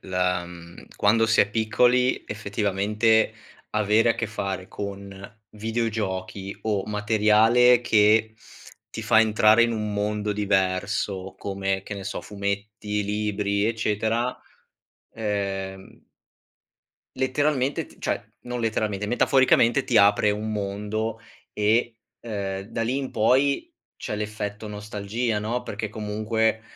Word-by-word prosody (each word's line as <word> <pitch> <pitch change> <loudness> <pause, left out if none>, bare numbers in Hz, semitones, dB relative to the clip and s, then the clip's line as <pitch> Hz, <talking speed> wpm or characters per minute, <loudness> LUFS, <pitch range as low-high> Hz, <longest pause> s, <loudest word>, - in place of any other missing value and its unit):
la 90 -1 -1
mhmm, 85 -1 -12
quando 110 +2 +3
si 110 - +4
è 100 - +3
piccoli 125 +4 +2
effettivamente 105 +1 +1 0.4
avere 110 +2 +3
a 115 - +1
che 115 - -1
fare 100 -3 -4
con 100 +1 -8
videogiochi 105 -4 -3
o 105 -3 -1
materiale 110 +3 +4
che 110 -1 +3 0.6
ti - - -6
fa 110 - +5
entrare 110 +1 +5
in 115 - +2
un 105 -2 -2
mondo 105 0 -1
diverso, 95 -1 -1
come 95 -1 -2
che 105 - -6
ne 100 - -7
so 100 - -4
fumetti, 105 +1 -3
libri, 105 0 -1
eccetera, 115 +2 0 0.8
ehm 95 -3 -4 1.2
letteralmente 135 +1 0
t - - -19
cioè, - - -2 0.2
non 125 0 -4
letteralmente, 105 -2 -1
metaforicamente 130 +1 +3
ti 120 - +1
apre 105 +1 +5
un 105 +1 -3
mondo 105 +2 -3 0.3
e, 115 +2 +1 0.2
ehm, 100 -4 -4
da 115 +1 -3
lì 125 +4 -1
in 135 -1 -3
poi 140 - +2 0.2
c'è - - -5
l'effetto 105 0 -5
nostalgia 105 +2 -3
no, 115 +4 -2
perché 110 +1 -5
comunque 110 +1 -1
105 Hz, 120 wpm, -25 LUFS, 100-115 Hz, 1.2 s, fa